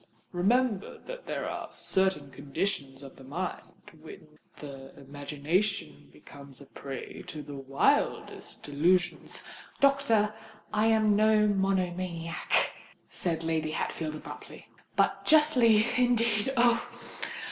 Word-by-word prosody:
Remember 210 +3 +1
that - - -8
there - - -2
are - - -5
certain 190 -8 0
conditions 140 -1 -3
of 135 - -11
the 135 - -13
mind, 170 +8 -6
when 155 -1 -13 0.2
the 135 -2 -10
imagination 145 - -2
becomes 140 - -13
a 140 - -12
prey 135 -1 -8
to 150 -1 -6
the 145 - -9
wildest 135 0 0
delusions——" 175 +5 +1 0.4
"Doctor, 275 -7 +3 0.4
I 215 +1 +3
am 215 -2 +4
no 215 0 +4
monomaniac," 185 -4 0 0.4
said 165 -2 -1
Lady 160 -1 -1
Hatfield 155 -1 -2
abruptly. 155 - -10 0.3
"But - - +2
justly, 250 -9 +5
indeed—oh! 240 0 +3
180 Hz, 105 wpm, -29 LUFS, 145-215 Hz, 0.4 s, justly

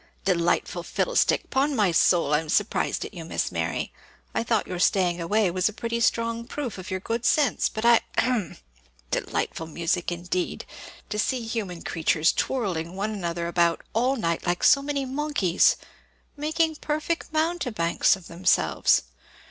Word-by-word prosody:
"Delightful 175 -3 +1
fiddlestick! - - 0
'Pon 280 +2 +1
my 205 -6 +3
soul, 165 -2 +3
I'm 155 +1 +1
surprised 205 +6 0
at - - -9
you, 170 -3 -7
Miss 160 - -2
Mary! - - -2 0.4
I - - 0
thought 225 -2 0
your 180 - -5
staying 180 -2 +2
away 200 +2 +2
was 185 +3 +1
a - - -9
pretty 235 +2 -3
strong 230 0 0
proof 250 -6 -5
of 185 - -8
your 185 -1 -2
good 230 +4 -3
sense; 290 -1 +2
but 220 +1 -4
I 235 -1 +6 0.2
hem! 235 -6 0 0.5
Delightful 165 - -2
amusement, 170 +2 -1
indeed! 175 +1 -3 0.4
to 210 0 -3
see 250 +2 0
human 205 -7 -4
creatures 160 -1 +1
twirling 185 -9 -2
one 205 +3 -2
another 170 -4 -3
about 170 -1 +1
all 250 +4 +2
night 170 -9 -1
like 175 0 0
so 275 - +6
many 280 -1 -2
monkeys 265 - +2 0.6
making 315 +1 0
perfect 310 +3 -2
mountebanks 310 - +1
of 190 -3 -14
themselves. 170 - +2
205 Hz, 155 wpm, -25 LUFS, 175-255 Hz, 0.6 s, I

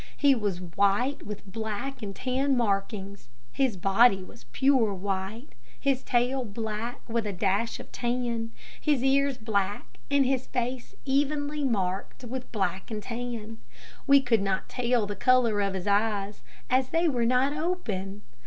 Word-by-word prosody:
He 285 -2 +5
was 205 -7 -1
white, 200 +10 +1
with 210 -1 -7
black 220 +6 -4
and 200 -2 -5
tan 265 +1 +1
markings. 200 - -2 0.2
His 260 -7 +1
body 195 +2 +4
was 125 -9 -14
pure 225 - +2
white, 195 +6 -3 0.3
his 275 -2 +1
tail 250 +2 +1
black, 220 +1 -5
with 230 -2 -1
a - - -1
dash 200 +4 0
of - - -11
tan; 240 -2 -2 0.3
his 290 -5 +2
ears 275 0 +3
black, 205 -3 -2
and 280 -1 +4
his 260 0 0
face 250 0 -3
evenly 290 +2 0
marked 195 -3 -1
with 255 +1 -6
black 190 -4 -2
and 215 -2 -4
tan. 230 -2 -5 0.5
We 280 0 +7
could 240 -5 +2
not 195 -1 -1
tell 240 -3 +1
the 205 0 -4
color 235 -1 +3
of 195 -1 0
his 185 - -4
eyes, 205 0 +1 0.3
as 255 0 +2
they 330 +1 +2
were 245 -6 +1
not 255 +3 +3
open. 210 - -3
230 Hz, 155 wpm, -28 LUFS, 200-260 Hz, 0.5 s, We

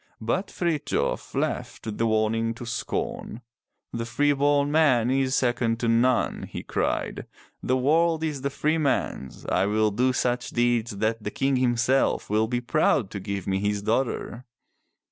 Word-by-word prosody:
But 120 - -1
Frithjof 170 -4 -2
laughed 110 -2 -3
the 115 - +2
warning 115 +1 +1
to 120 - -8
scorn. 120 0 -4 0.5
"The 115 0 -3
free 145 +4 +2
born 145 0 +2
man 130 -7 +3
is 130 0 +1
second 120 -2 +1
to 120 - 0
none," 120 +2 +2
he - - -6
cried. - - -2 0.3
"The 130 - +1
world 160 +4 +2
is 150 -4 -2
the 140 - -1
freeman's. 145 - -1
I 95 +2 +1
will 110 +1 +2
do 125 +5 +2
such 125 -1 -1
deeds 120 -3 0
that 110 +1 -1
the 105 - -2
King 135 +4 0
himself 125 -1 +1
will 110 +1 +2
be 120 +1 -1
proud 125 - +1
to 100 - -5
give 100 -1 -4
me 95 0 0
his 105 0 -1
daughter." 120 +1 -1
120 Hz, 155 wpm, -25 LUFS, 110-135 Hz, 0.5 s, man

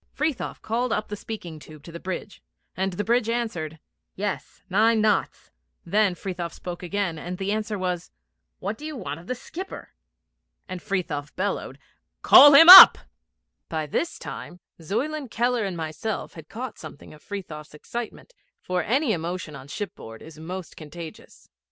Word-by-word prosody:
Frithiof 300 -3 -3
called 235 +2 -1
up 215 -1 -2
the 210 - -4
speaking 180 -7 -8
tube 155 -1 -14
to 170 - -11
the 170 - -8
bridge, 190 +2 -6 0.3
and 190 0 -2
the 205 - -3
bridge 235 0 +1
answered, 180 -10 -3 0.4
'Yes, 205 +1 -5
nine 220 +4 +3
knots.' 210 -2 0 0.3
Then 200 +1 +2
Frithiof 175 -2 -5
spoke 175 -1 -8
again, 180 -2 -3
and 180 +3 -6
the 195 +1 -2
answer 215 0 -2
was, 180 -2 -3 0.5
'What 205 +3 -5
do 300 - -9
you 310 - -6
want 155 - -6
of 175 - -15
the 255 - -2
skipper?' 370 +9 -9 0.7
and 185 -1 -7
Frithiof 150 -7 -4
bellowed, 200 +2 -3 0.5
'Call 290 0 +9
him 325 +4 +9
up.' 375 +1 +13 0.7
By 160 -1 -3
this 325 - -3
time 175 - -9 0.2
Zuyland, 265 - -3
Keller, 240 -1 0
and 185 -3 -4
myself 160 +7 -5
had 160 -2 -13
caught 245 +4 -7
something 145 - -11
of 150 - -16
Frithiof's 155 -8 -8
excitement, 235 - -8 0.3
for 180 0 -2
any 265 +2 0
emotion 170 -2 -5
on 135 0 -11
shipboard 140 - -8
is 155 0 -13
most 180 +3 -7
contagious. 160 +1 -11
190 Hz, 160 wpm, -24 LUFS, 165-225 Hz, 0.7 s, up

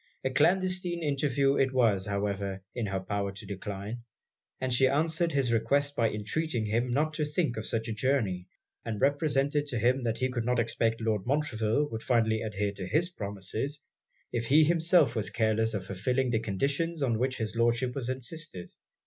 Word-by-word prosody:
A 130 - 0
clandestine 180 +3 +1
interview 140 -1 +1
it 135 -1 +2
was, 110 -7 +2
however, 100 -1 -2
in 120 -4 -2
her 95 0 -1
power 100 +1 -2
to 100 +2 -9
decline; 100 +3 -5 0.6
and 130 -1 -1
she 130 +2 +4
answered 160 +4 +1
his 135 -5 +1
request 145 +5 +1
by 115 -1 +2
entreating 115 +4 -2
him 115 +4 0
not 150 +5 +1
to 150 - -1
think 150 -3 0
of 110 - -4
such 115 0 -1
a 115 - -2
journey; 105 -7 0 0.4
and 110 -3 -4
represented 145 0 +1
to 125 - -2
him 125 +3 +2
that 115 -1 0
he 130 0 0
could 120 -2 -2
not 125 +1 +1
expect 115 0 0
Lord 110 -3 -1
Montreville 140 -2 +1
would 110 0 -4
finally 110 -3 +2
adhere 105 -2 -2
to 95 -2 -7
his 165 - +1
promises, 105 - -4 0.5
if 115 -1 -1
he 150 +5 +6
himself 165 -4 +3
was 110 -2 -1
careless 110 -1 +1
of 95 -2 -3
fulfilling 125 +7 0
the 110 - +2
conditions 140 - -1
on 115 -4 +1
which 130 +1 0
his 110 0 -3
Lordship 120 +2 +2
had 130 -2 -2
insisted. 130 - -5
120 Hz, 185 wpm, -29 LUFS, 110-145 Hz, 0.6 s, he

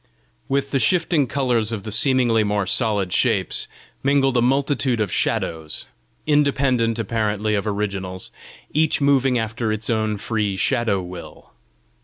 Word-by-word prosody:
With 140 0 0
the 135 - +1
shifting 160 +2 +2
colours 120 -5 0
of 110 -4 -4
the 110 - -6
seemingly 120 0 +3
more 105 -1 0
solid 100 -3 0
shapes, 105 -7 0 0.3
mingled 135 -1 +2
a 120 - +3
multitude 130 -2 +1
of 105 -4 -1
shadows, 80 -2 -2 0.4
independent 140 -6 +2
apparently 110 -1 -1
of 105 +1 -1
originals, 100 -3 -3 0.4
each 155 +1 +2
moving 135 -3 +3
after 115 0 -2
its 110 +2 -2
own 110 -1 0
free 105 -1 -1
shadow 100 -3 +1
will. 90 -4 -10
115 Hz, 135 wpm, -22 LUFS, 105-135 Hz, 0.4 s, seemingly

